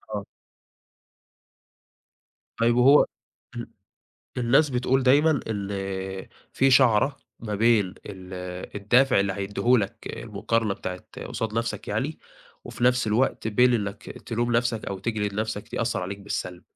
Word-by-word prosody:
آه. 100 -1 -4 2.3
طيب 115 +1 +3
وهو 135 +4 +6 0.5
ال - - -5 0.7
الناس 135 +5 +3
بتقول 130 +1 +1
دايمًا 145 +3 +4
ال 95 -2 -4 0.2
في 135 0 +3
شعرة 130 +1 +4 0.2
ما 105 -2 -4
بين 110 -1 +4 0.2
ال 95 -1 -9 0.4
الدافع 125 +4 +4
اللي 100 0 0
هيدهولك 100 +3 0
المقارنة 115 -3 -2
بتاعة 90 -1 -6 0.3
قصاد 115 -3 -3
نَفْسك 115 0 -3
يعني، - - -2 0.5
وفي 120 - -4
نَفْس 125 -1 +3
الوقت 110 +1 +1
بين 125 +3 +4
إنّك 105 -2 -3
تلوم 120 +1 -3
نَفْسك 120 -2 0
أو 100 - -4
تجلد 105 -2 -2
نَفْسك 105 -1 -4
يأثر 115 -5 -1
عليك 100 +2 -5
بالسلب، 90 -3 -5
110 Hz, 120 wpm, -25 LUFS, 100-125 Hz, 2.3 s, وهو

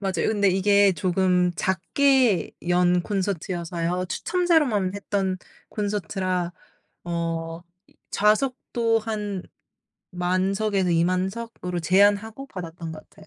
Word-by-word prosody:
맞아요. 195 -2 0
근데 205 -2 +2
이게 200 +1 +4
조금 180 +1 +1
작게 225 - +2 0.2
연 180 0 +3
콘서트여서요. 180 -2 -2
추첨자로만 305 - +1
했던 200 -2 -1 0.3
콘서트라 185 -3 -2 0.5
어 165 -1 -3 0.3
이 - - -26 0.2
좌석도 230 +1 +1
한 210 -4 -4 0.7
10,000 185 +2 +1
석에서 195 -3 0
20,000 180 +3 +2
석으로 200 -5 -5
제한하고 205 +8 +2
받았던 170 -6 -7
거 155 - -8
같아요. 155 - -19
190 Hz, 235 characters per minute, -24 LUFS, 175-210 Hz, 0.7 s, 이게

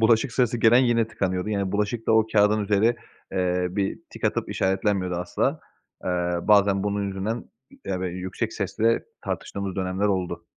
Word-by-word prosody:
bulaşık 115 +2 +3
sırası 120 -2 +1
gelen 115 +2 +6
yine 120 -3 +3
tıkanıyordu. 95 -2 -2
Yani 100 -2 -1
bulaşık 105 +2 -1
da - - +3
o 110 0 +4
kâğıdın 105 0 +4
üzeri, 105 +4 +2 0.4
ııı, 90 0 0
bir 100 -1 -1
tik - - -9
atıp - - 0
işaretlenmiyordu 95 -1 0
asla. 90 0 -1 0.4
Iıı, 90 +1 -1
bazen 100 -2 +5
bunun 100 0 -1
yüzünden, 100 +5 -3 0.4
ya, 95 -2 -2
böyle, 90 -1 -3
yüksek 100 +5 -3
sesle 110 +3 0 0.2
tartıştığımız 100 -1 -4
dönemler 95 +2 0
oldu. 95 -3 -2
100 Hz, 160 wpm, -25 LUFS, 95-110 Hz, 0.4 s, gelen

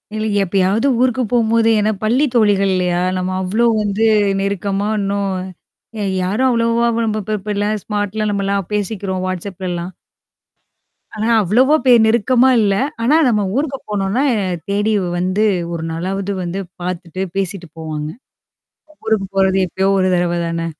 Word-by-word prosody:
இல்ல, 215 0 -2 0.2
எப்பயாவது 195 +5 +1
ஊருக்கு 255 0 +2
போகும்போது 230 -1 +3
ஏன்னா 215 +1 +1
பள்ளி 245 +7 +2
தோழிகள் 205 -3 +3
இல்லயா! 180 -1 0 0.2
நம்ம 185 0 -2
அவ்ளோ 210 +6 0 0.2
வந்து 205 +1 -1 0.4
நெருக்கமா 200 +1 -1
இன்னும் 200 0 -1 0.7
எ - - -1 0.2
யாரும் 210 +8 +1
அவ்வளவா 230 0 +2 0.2
நம்ம 215 0 -1
இப்ப 215 +2 -2
இப்ப 210 +2 -5
எல்லாம் 210 +1 -1
ஸ்மார்ட்லாம் 210 0 -2
நம்மலாம் 200 -2 -1
பேசிக்கிறோம் 195 -2 -2
whatsappலலாம். 185 -1 -4 1.2
ஆனா 215 +1 -2
அவ்வளவ 255 - +3
பே 255 - +6
நெருக்கமா 240 +3 +3
இல்ல. 200 -1 +2 0.3
ஆனா 270 +6 +3
நம்ம 210 -3 +2
ஊருக்கு 275 -1 -1
போனோனா, 205 +5 0 0.5
தேடி 205 +2 +1 0.2
வந்து 185 +4 0 0.3
ஒரு 165 -1 -4
நாளாவது 190 +4 -3
வந்து 175 +2 -4 0.2
பார்த்துட்டு 180 0 -5
பேசிட்டு 195 -2 -3
போவாங்க. 155 -1 -5 1.0
ஊருக்கு 220 -3 0
போறது 190 0 +3
எப்பயோ 190 +3 -1
ஒரு 185 0 +2
தடவ 175 -1 +1
தானே! 165 0 -2
200 Hz, 135 wpm, -18 LUFS, 185-220 Hz, 1.2 s, பே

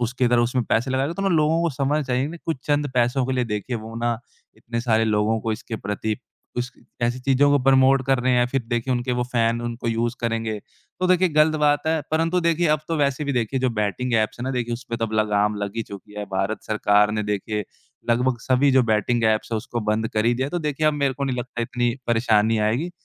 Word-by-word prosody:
उसकी 125 +1 0
तरह 120 0 +3
उसमें 125 0 0
पैसे 120 +4 0
लगाएगा। 135 +4 0
तो 195 - -4
ना 195 - +2
लोगों 160 -1 +2
को 170 - +1
समझना 145 +3 0
चाहिए 130 0 0
ना 170 - -7
कुछ 165 - 0
चंद 145 -1 +1
पैसों 125 +2 +2
के 130 - -1
लिए 125 -1 +1
देखिए 110 +2 -3
वो 110 +1 -8
ना 115 -1 -1 0.4
इतने 115 0 -4
सारे 115 -2 +2
लोगों 110 +1 +1
को 110 0 -1
इसके 110 +1 -5
प्रति 105 +2 -3 0.4
कुछ 125 0 -2 0.3
ऐसी 120 +1 +1
चीज़ों 135 +2 +3
को 145 - +4
प्रमोट 135 0 +5
कर 135 -1 +3
रहे 125 +1 +1
हैं 125 - +4
या 120 - +3
फिर 135 -2 +1
देखिए 120 +2 -1
उनके 125 +1 -1
वो 125 - 0
फैन 115 -1 +1
उनको 120 0 -4
यूज़ 115 +1 0
करेंगे। 115 -2 -2 0.4
तो 185 - +2
देखिए 185 0 +4
गलत 155 0 +3
बात 145 +1 +2
है 160 0 +2
परंतु 165 +3 +1
देखिए 170 0 +2
अब - - -15
तो 165 - 0
वैसे 140 0 0
भी 140 - -1
देखिए 125 +1 -1
जो 130 -1 +1
बैटिंग 120 +4 -1
ऐप्स 110 +1 +1
है 120 - -3
ना 130 - -1
देखिए 120 -2 -2
उसपे 120 -1 -5
तो 115 - -1
अब 110 - -9
लग़ाम 105 0 +1
लग 100 +2 -4
ही 115 - 0
चुकी 100 0 -11
है। 105 - -3
भारत 95 +3 -1
सरकार 105 -1 +3
ने 105 - -1
देखिए 105 0 -2 0.5
लगभग 125 +1 +2
सभी 130 +3 +3
जो 130 0 +5
बैटिंग 115 +1 +1
ऐप्स 110 +1 +1
है - - +1
उसको 120 +2 -4
बंद 110 +1 0
कर 110 0 -1
ही 120 - +3
दिया 130 +2 -1
है। - - -6
तो 175 - -1
देखिए 150 -1 -1
अब 155 - +4
मेरे 140 -2 +1
को 140 +2 -3
नहीं 130 -2 -1
लगता 120 -1 -4
इतनी 120 0 -1
परेशानी 115 -1 +2
आएगी। 115 +11 0
120 Hz, 245 wpm, -23 LUFS, 115-135 Hz, 0.5 s, प्रमोट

